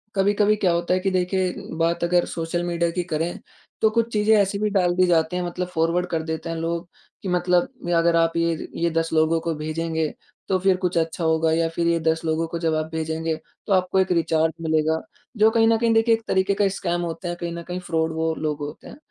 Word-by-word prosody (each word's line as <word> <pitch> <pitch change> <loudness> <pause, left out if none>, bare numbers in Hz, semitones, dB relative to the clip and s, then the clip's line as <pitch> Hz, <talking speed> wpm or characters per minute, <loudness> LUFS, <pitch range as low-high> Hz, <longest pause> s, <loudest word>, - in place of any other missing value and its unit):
कभी-कभी 205 +2 +3
क्या 195 -4 +1
होता 170 +1 0
है 185 - +2
कि 195 - 0
देखिए 185 0 0 0.2
बात 165 +1 0
अगर 175 0 +3
सोशल 165 +1 -3
मीडिया 170 -1 0
की 180 +1 -2
करें 165 +3 -2 0.4
तो 220 - +5
कुछ 230 +1 0
चीज़ें 215 +1 +4
ऐसी 200 0 +1
भी 210 0 +1
डाल 180 -3 +2
दी 185 0 +4
जाती 165 0 +2
हैं 180 - -1
मतलब 175 +1 -3
फॉरवर्ड 165 +2 +1
कर 160 -1 -1
देते 160 0 -4
हैं 165 - -3
लोग 170 +1 -3 0.4
कि 190 - -3
मतलब 180 0 +2 0.2
या 175 -1 +2
अगर 170 0 +3
आप 165 0 +3
ये 165 0 +1
ज - - -7
ये 170 0 +1
10 165 0 0
लोगों 160 +1 +3
को 165 0 -1
भेजेंगे 160 +1 -2 0.4
तो 190 - +2
फिर 190 0 +3
कुछ 180 -2 -1
अच्छा 165 +1 -1
होगा 160 0 +2
या 165 +1 +2
फिर 170 +1 -1
ये 170 0 +2
10 160 0 +1
लोगों 160 +1 0
को 170 - -5
जब 165 -2 0
आप 155 0 0
भेजेंगे 160 0 -2 0.3
तो 200 - +2
आपको 185 +1 +2
एक 190 -1 +1
रिचार्ज 160 -1 +2
मिलेगा 160 0 +1 0.4
जो 215 +1 +6
कहीं 225 -1 +4
न 225 0 +4
कहीं 230 0 +2
देखिए 225 +1 +4
एक 225 - -8
तरीके 190 +1 +2
का 200 0 +2
स्कैम 175 -2 -2
होते 170 +1 -4
हैं 175 0 -3
कहीं 170 0 -3
न 170 - -5
कहीं 180 +1 -5
फ्रॉड 160 -2 -1
वो 160 0 0
लोग 150 -1 -2
होते 145 +1 -7
हैं। - - -11
170 Hz, 240 wpm, -23 LUFS, 160-185 Hz, 0.4 s, जो